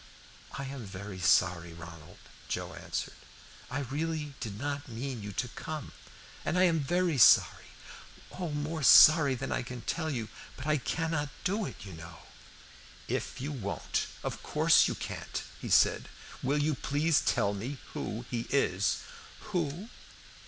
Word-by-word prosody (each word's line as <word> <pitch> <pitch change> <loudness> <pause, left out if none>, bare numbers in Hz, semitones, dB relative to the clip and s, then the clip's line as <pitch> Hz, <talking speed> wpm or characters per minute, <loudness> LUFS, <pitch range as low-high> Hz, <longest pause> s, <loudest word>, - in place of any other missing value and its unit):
"I 140 - -5
am 135 -2 -6
very 95 -1 -7
sorry, 85 -1 +3
Ronald," 85 -1 -11 0.3
Joe - - -3
answered. - - -4 0.6
"I 145 +3 -2
really 150 +2 -3
did 110 -6 -5
not 145 +1 -3
mean 120 0 -5
you 105 0 -6
to 125 - -2
come, 155 +4 -6 0.5
and 175 - 0
I 185 - +5
am 170 -3 +4
very 170 +1 +1
sorry, - - +6 0.6
oh, 180 -2 -4
more 150 +2 -3
sorry 145 0 +8
than 135 +2 -4
I - - 0
can 125 0 -7
tell 160 +4 -2
you, 120 -7 -3 0.3
but 130 - -7
I 155 0 +2
cannot 160 +1 -1
do 200 +2 0
it, - - -8
you 95 - -9
know." 85 +1 -10 0.9
"If - - -3
you 140 +4 -3
won't, 110 -8 -2 0.2
of - - -4
course - - +4
you - - -2
can't," - - -5 0.2
he - - -5
said. - - +4 0.3
"Will 140 +3 +1
you 150 +1 +2
please 150 +3 +1
tell 100 0 +1
me 120 +8 -5 0.2
who 115 +3 -4
he 120 -2 -2
is?" 100 -8 +1 0.5
"Who? 175 +4 -2
140 Hz, 155 wpm, -30 LUFS, 110-155 Hz, 0.9 s, sorry